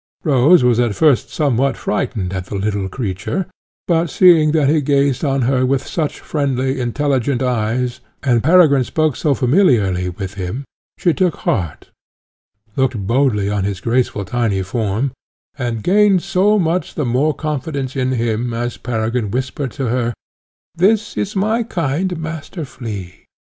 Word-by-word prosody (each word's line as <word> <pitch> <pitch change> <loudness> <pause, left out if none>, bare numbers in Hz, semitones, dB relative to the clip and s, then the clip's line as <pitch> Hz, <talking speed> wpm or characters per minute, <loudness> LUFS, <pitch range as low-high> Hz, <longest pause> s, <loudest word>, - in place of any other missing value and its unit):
Rose 145 +1 +5
was 120 -1 +3
at 120 -4 +1
first 150 -6 +3
somewhat 135 -4 0
frightened 100 -3 -2
at 95 -1 -4
the - - -6
little 100 -1 -2
creature, 100 - -3 0.4
but 170 -1 +1
seeing 165 -4 +5
that 155 -3 +2
he 155 +1 +3
gazed 140 -1 +1
on 135 -3 +1
her 130 +1 +2
with 130 +1 0
such 155 -4 -3
friendly, 135 -2 -1
intelligent 135 +1 0
eyes, 125 +1 -1 0.2
and 120 -4 +2
Peregrine 155 -4 +5
spoke 155 +1 0
so 145 -3 +1
familiarly 120 - +2
with 95 +1 -6
him, 100 +8 -5 0.3
she 175 - +2
took 180 -2 +1
heart, 85 -9 -2 0.8
looked 130 -3 +1
boldly 115 -3 +1
on 100 -1 -1
his 100 -1 -2
graceful 115 -2 0
tiny 105 -3 -1
form, 110 +5 -1 0.4
and 120 -5 -3
gained 200 -1 +4
so 195 +2 +2
much 175 -1 -1
the 150 - -1
more 130 +5 +1
confidence 140 -3 -3
in 130 -1 0
him 115 0 -1
as 120 +1 -3
Peregrine 115 -2 -2
whispered 130 +4 -3
to 135 - -3
her, 120 -1 -1 0.6
"this 205 +6 +1
is 210 +1 -3
my 215 +4 +1
kind 175 - -2
Master 160 +1 -6
Flea." 100 -9 -8
130 Hz, 150 wpm, -18 LUFS, 115-155 Hz, 0.8 s, Rose